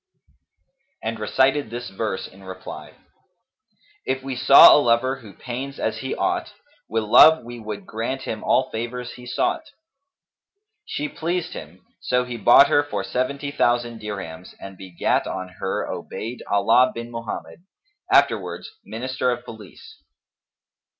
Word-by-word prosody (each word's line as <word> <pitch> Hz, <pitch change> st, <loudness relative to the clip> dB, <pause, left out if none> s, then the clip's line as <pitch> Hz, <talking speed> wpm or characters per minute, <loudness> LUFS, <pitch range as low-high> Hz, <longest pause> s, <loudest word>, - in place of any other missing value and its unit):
and 115 Hz, 0 st, -3 dB
recited 135 Hz, +4 st, +1 dB
this 120 Hz, -1 st, -6 dB
verse 95 Hz, -1 st, -3 dB
in 95 Hz, +1 st, -17 dB
reply, 95 Hz, 0 st, -9 dB, 1.1 s
"If 130 Hz, 0 st, -2 dB
we 135 Hz, -1 st, -4 dB
saw 130 Hz, +2 st, +9 dB
a 150 Hz, -, +5 dB
lover 130 Hz, +2 st, +2 dB
who 110 Hz, -6 st, -13 dB
pains 130 Hz, +3 st, -6 dB
as 110 Hz, 0 st, -2 dB
he 130 Hz, +3 st, -4 dB
ought, -, -, -1 dB, 0.2 s
* -, -, -35 dB
Wi' 115 Hz, +1 st, 0 dB
love 155 Hz, +9 st, +7 dB
we 120 Hz, 0 st, -9 dB
would 105 Hz, -2 st, -7 dB
grant 125 Hz, +4 st, -4 dB
him 110 Hz, -1 st, -5 dB
all 130 Hz, -, +2 dB
favours 120 Hz, +2 st, -5 dB
he 125 Hz, 0 st, -12 dB
sought." 340 Hz, -, 0 dB, 1.3 s
She 150 Hz, -, -3 dB
pleased 175 Hz, +3 st, -3 dB
him: 85 Hz, +4 st, -11 dB, 0.2 s
so 125 Hz, 0 st, +1 dB
he 125 Hz, -1 st, -6 dB
bought 120 Hz, +5 st, +7 dB
her 145 Hz, -, +4 dB
for 105 Hz, -9 st, -4 dB
seventy 140 Hz, +6 st, -2 dB
thousand 120 Hz, -4 st, 0 dB
dirhams 95 Hz, -5 st, -7 dB
and 95 Hz, 0 st, -9 dB
begat 90 Hz, -2 st, -1 dB
on 95 Hz, -1 st, -5 dB
her 95 Hz, -, -2 dB
Obayd' 115 Hz, +3 st, -6 dB
Allah 115 Hz, +6 st, +4 dB
bin 115 Hz, 0 st, -7 dB
Mohammed, 115 Hz, +7 st, -7 dB, 0.5 s
afterwards -, -, +2 dB
minister 130 Hz, +2 st, -3 dB
of 120 Hz, -, -3 dB
Police. 110 Hz, -4 st, -13 dB
120 Hz, 145 wpm, -23 LUFS, 105-130 Hz, 1.3 s, saw